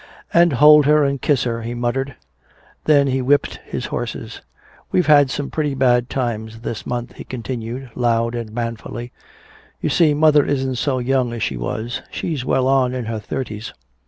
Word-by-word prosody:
"And 170 Hz, -2 st, +5 dB
hold 150 Hz, +2 st, +7 dB
her 150 Hz, 0 st, +5 dB
and 140 Hz, -1 st, -1 dB
kiss 140 Hz, -5 st, +2 dB
her," 115 Hz, -1 st, -2 dB
he 120 Hz, +2 st, -5 dB
muttered. 125 Hz, +3 st, -2 dB, 0.7 s
Then 145 Hz, -2 st, +5 dB
he 135 Hz, -1 st, 0 dB
whipped 140 Hz, +3 st, +1 dB
his -, -, -4 dB
horses. -, -, -5 dB, 0.5 s
"We've 180 Hz, -, +2 dB
had 145 Hz, -2 st, +6 dB
some 140 Hz, +1 st, -4 dB
pretty 150 Hz, -3 st, -1 dB
bad 125 Hz, -2 st, +2 dB
times 115 Hz, -3 st, -3 dB
this 115 Hz, -2 st, -5 dB
month," 120 Hz, 0 st, -4 dB
he -, -, -7 dB
continued, 125 Hz, 0 st, -6 dB
loud 115 Hz, -1 st, +1 dB
and 115 Hz, -2 st, -5 dB
manfully. 120 Hz, +1 st, -5 dB, 0.7 s
"You -, -, -1 dB
see, 155 Hz, -4 st, +3 dB
mother 150 Hz, -1 st, +5 dB
isn't 135 Hz, -2 st, -1 dB
so 135 Hz, +1 st, 0 dB
young 125 Hz, -1 st, 0 dB
as 115 Hz, -, -3 dB
she 70 Hz, -, -1 dB
was. 110 Hz, -, -4 dB
She's 155 Hz, -7 st, -3 dB
well 130 Hz, 0 st, +1 dB
on 130 Hz, -2 st, +2 dB
in 125 Hz, -2 st, -3 dB
her 110 Hz, 0 st, -3 dB
thirties." 110 Hz, 0 st, -5 dB
130 Hz, 175 wpm, -20 LUFS, 120-140 Hz, 0.7 s, hold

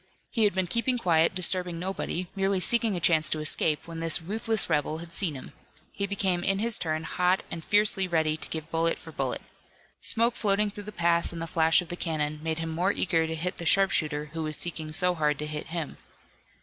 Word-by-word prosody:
He 225 Hz, -4 st, +3 dB
had 200 Hz, -, +1 dB
been 190 Hz, -1 st, +1 dB
keeping 235 Hz, +6 st, +1 dB
quiet, 170 Hz, -5 st, +2 dB
disturbing 180 Hz, -1 st, +2 dB
nobody, 185 Hz, 0 st, -3 dB
merely 195 Hz, 0 st, +1 dB
seeking 230 Hz, +1 st, +2 dB
a -, -, -2 dB
chance 160 Hz, -2 st, +3 dB
to 155 Hz, -, -1 dB
escape, 155 Hz, 0 st, 0 dB
when 165 Hz, -1 st, -7 dB
this 165 Hz, -1 st, +4 dB
ruthless 215 Hz, +4 st, -1 dB
rebel 155 Hz, -1 st, 0 dB
had 165 Hz, 0 st, -8 dB
seen 170 Hz, -4 st, -1 dB
him. 130 Hz, -, -9 dB, 0.4 s
He 200 Hz, -, -3 dB
became 190 Hz, -3 st, 0 dB
in 195 Hz, +1 st, +1 dB
his 225 Hz, +2 st, +2 dB
turn 155 Hz, -1 st, -2 dB
hot 180 Hz, +2 st, +1 dB
and 165 Hz, -, -6 dB
fiercely 205 Hz, -1 st, +3 dB
ready 160 Hz, -3 st, +1 dB
to 155 Hz, -, -6 dB
give 160 Hz, 0 st, -6 dB
bullet 165 Hz, 0 st, +1 dB
for -, -, -11 dB
bullet. -, -, -3 dB, 0.6 s
Smoke 235 Hz, +1 st, +2 dB
floating 205 Hz, 0 st, +1 dB
through 205 Hz, 0 st, -9 dB
the 210 Hz, -, -7 dB
pass 170 Hz, -2 st, +1 dB
and 170 Hz, -, -7 dB
the 165 Hz, -, -3 dB
flash 160 Hz, +1 st, +3 dB
of 170 Hz, -, -15 dB
the 175 Hz, -, -4 dB
cannon, 155 Hz, -3 st, -2 dB
made 160 Hz, 0 st, -2 dB
him 165 Hz, 0 st, -3 dB
more 175 Hz, +5 st, +1 dB
eager 165 Hz, -4 st, +1 dB
to 160 Hz, -, -3 dB
hit 180 Hz, +3 st, -3 dB
the 170 Hz, -, -5 dB
sharpshooter 155 Hz, -6 st, +1 dB
who 165 Hz, -, -4 dB
was 155 Hz, -1 st, -1 dB
seeking 160 Hz, -3 st, -3 dB
so 180 Hz, +3 st, +3 dB
hard 150 Hz, -3 st, 0 dB
to 150 Hz, -, -3 dB
hit 150 Hz, 0 st, -5 dB
him. 165 Hz, -2 st, -5 dB
170 Hz, 220 wpm, -27 LUFS, 160-195 Hz, 0.6 s, this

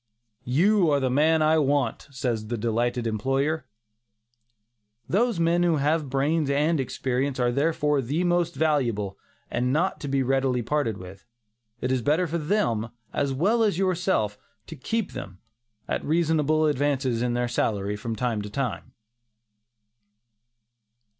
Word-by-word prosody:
"You 175 Hz, +7 st, +3 dB
are 145 Hz, -, +3 dB
the 130 Hz, -2 st, 0 dB
man 155 Hz, +4 st, +3 dB
I 155 Hz, +1 st, +4 dB
want," 145 Hz, 0 st, 0 dB
says 125 Hz, -5 st, -3 dB
the 120 Hz, +1 st, -3 dB
delighted 120 Hz, +2 st, -1 dB
employer. 135 Hz, +7 st, -1 dB, 1.4 s
Those 225 Hz, 0 st, +1 dB
men 170 Hz, +1 st, +2 dB
who 175 Hz, -2 st, +3 dB
have 150 Hz, 0 st, 0 dB
brains 140 Hz, +3 st, +1 dB
and 150 Hz, +3 st, +2 dB
experience 130 Hz, +1 st, -2 dB
are 120 Hz, -1 st, +2 dB
therefore 150 Hz, +1 st, +1 dB
the 145 Hz, +8 st, -1 dB
most 175 Hz, -1 st, +1 dB
valuable 120 Hz, -10 st, 0 dB, 0.3 s
and 125 Hz, +2 st, 0 dB
not 170 Hz, +7 st, 0 dB
to 145 Hz, -, -6 dB
be 135 Hz, -1 st, +1 dB
readily 130 Hz, -1 st, +1 dB
parted 120 Hz, -4 st, -1 dB
with; 95 Hz, +2 st, -12 dB, 0.5 s
it 125 Hz, -, -1 dB
is 130 Hz, -1 st, +1 dB
better 155 Hz, +8 st, +2 dB
for 170 Hz, +1 st, -2 dB
them, 150 Hz, -, 0 dB, 0.2 s
as 140 Hz, -1 st, 0 dB
well 200 Hz, -, +2 dB
as 210 Hz, -6 st, +2 dB
yourself, 180 Hz, -, 0 dB, 0.3 s
to -, -, -9 dB
keep 225 Hz, -, -2 dB
them, 95 Hz, -1 st, -8 dB, 0.5 s
at -, -, -2 dB
reasonable 155 Hz, -1 st, +2 dB
advances 140 Hz, -4 st, 0 dB
in 120 Hz, 0 st, 0 dB
their 120 Hz, 0 st, 0 dB
salaries 105 Hz, -3 st, -1 dB
from 115 Hz, +2 st, -4 dB
time 115 Hz, -1 st, -1 dB
to 105 Hz, -, -6 dB
time. 125 Hz, +1 st, -4 dB
140 Hz, 145 wpm, -25 LUFS, 120-160 Hz, 1.4 s, I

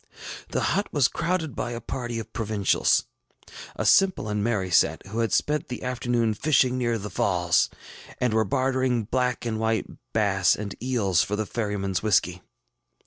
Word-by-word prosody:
The -, -, -1 dB
hut 200 Hz, +2 st, -1 dB
was 140 Hz, -3 st, +3 dB
crowded 165 Hz, -4 st, -2 dB
by 120 Hz, -1 st, -3 dB
a 115 Hz, -, -4 dB
party 120 Hz, 0 st, -5 dB
of 115 Hz, -, -7 dB
provincials, 105 Hz, -3 st, +1 dB, 0.7 s
a -, -, -3 dB
simple 190 Hz, -, +4 dB
and 105 Hz, -1 st, -1 dB
merry 100 Hz, -5 st, -1 dB
set, -, -, +3 dB
who 105 Hz, +4 st, -5 dB
had 115 Hz, -3 st, 0 dB
spent 150 Hz, 0 st, 0 dB
the 125 Hz, -, -6 dB
afternoon 120 Hz, -3 st, 0 dB
fishing 130 Hz, +1 st, +2 dB
near 120 Hz, -2 st, 0 dB
the 105 Hz, -1 st, -7 dB
Falls, 85 Hz, -2 st, +2 dB, 0.5 s
and 125 Hz, -3 st, +1 dB
were 110 Hz, 0 st, +3 dB
bartering 130 Hz, -2 st, 0 dB
black 125 Hz, +2 st, -1 dB
and 110 Hz, -2 st, -2 dB
white 110 Hz, -2 st, 0 dB, 0.3 s
bass 95 Hz, -4 st, +2 dB
and 100 Hz, -2 st, -5 dB
eels 110 Hz, -8 st, +1 dB
for 105 Hz, -, -1 dB
the 110 Hz, +1 st, -2 dB
ferrymanŌĆÖs 100 Hz, -5 st, -2 dB
whiskey. 90 Hz, -4 st, +1 dB
115 Hz, 165 wpm, -25 LUFS, 105-125 Hz, 0.7 s, simple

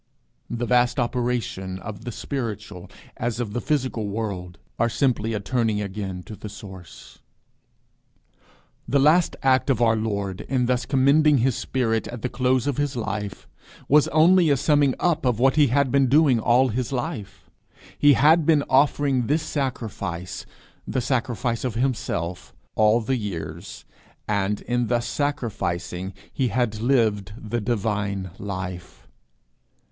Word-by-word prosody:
'" -, -, -45 dB
The 120 Hz, +1 st, -2 dB
vast 125 Hz, +2 st, +2 dB
operations 120 Hz, -6 st, -2 dB
of 110 Hz, +1 st, -8 dB
the 120 Hz, -, -4 dB
spiritual 105 Hz, -8 st, -5 dB, 0.3 s
as 120 Hz, -1 st, -2 dB
of 110 Hz, -4 st, -3 dB
the 120 Hz, -, -2 dB
physical 130 Hz, -7 st, -1 dB
world, 100 Hz, -4 st, -4 dB, 0.2 s
are 115 Hz, -, +3 dB
simply 115 Hz, -3 st, 0 dB
a -, -, -1 dB
turning 110 Hz, 0 st, 0 dB
again 95 Hz, -2 st, -5 dB
to 110 Hz, -, -9 dB
the 105 Hz, -, -8 dB
source. 95 Hz, -4 st, -12 dB, 1.7 s
The 135 Hz, +4 st, +2 dB
last 155 Hz, +5 st, +4 dB
act 130 Hz, +1 st, +3 dB
of 130 Hz, -5 st, +2 dB
our 115 Hz, -2 st, +4 dB
Lord 100 Hz, -4 st, -3 dB
in 130 Hz, -2 st, +1 dB
thus 125 Hz, 0 st, 0 dB
commending 145 Hz, +2 st, +4 dB
his 125 Hz, 0 st, +1 dB
spirit 115 Hz, -4 st, -1 dB
at 120 Hz, -2 st, -8 dB
the 125 Hz, -, -1 dB
close 130 Hz, -1 st, +1 dB
of 145 Hz, -3 st, -1 dB
his 145 Hz, -2 st, -1 dB
life, 105 Hz, -4 st, -4 dB, 0.4 s
was 150 Hz, +1 st, +5 dB
only 165 Hz, +2 st, +5 dB
a 140 Hz, -, +3 dB
summing 145 Hz, -1 st, +3 dB
up 165 Hz, -2 st, +1 dB
of 125 Hz, -4 st, +1 dB
what 135 Hz, +3 st, +3 dB
he 150 Hz, -2 st, +5 dB
had 135 Hz, +1 st, +1 dB
been 140 Hz, -1 st, +3 dB
doing 140 Hz, -2 st, +4 dB
all 125 Hz, +4 st, +3 dB
his 120 Hz, +2 st, -2 dB
life. 125 Hz, -, -5 dB, 0.4 s
He 145 Hz, 0 st, +5 dB
had 155 Hz, +4 st, +5 dB
been 150 Hz, -2 st, +3 dB
offering 135 Hz, -2 st, +3 dB
this 155 Hz, +3 st, +1 dB
sacrifice, 110 Hz, -, -4 dB, 0.4 s
the -, -, -1 dB
sacrifice 120 Hz, -1 st, -1 dB
of 125 Hz, -3 st, -2 dB
himself, 90 Hz, -8 st, -2 dB, 0.2 s
all 110 Hz, +2 st, +3 dB
the 130 Hz, +4 st, -1 dB
years, 85 Hz, -6 st, -6 dB, 0.4 s
and 100 Hz, 0 st, 0 dB
in 120 Hz, -1 st, -1 dB
thus 120 Hz, 0 st, 0 dB
sacrificing 95 Hz, -, -3 dB, 0.2 s
he 130 Hz, -, 0 dB
had 115 Hz, -3 st, -1 dB
lived 110 Hz, -6 st, +1 dB
the 115 Hz, +1 st, -3 dB
divine 100 Hz, -4 st, -2 dB
life. 95 Hz, -9 st, -6 dB
120 Hz, 150 wpm, -24 LUFS, 105-135 Hz, 1.7 s, was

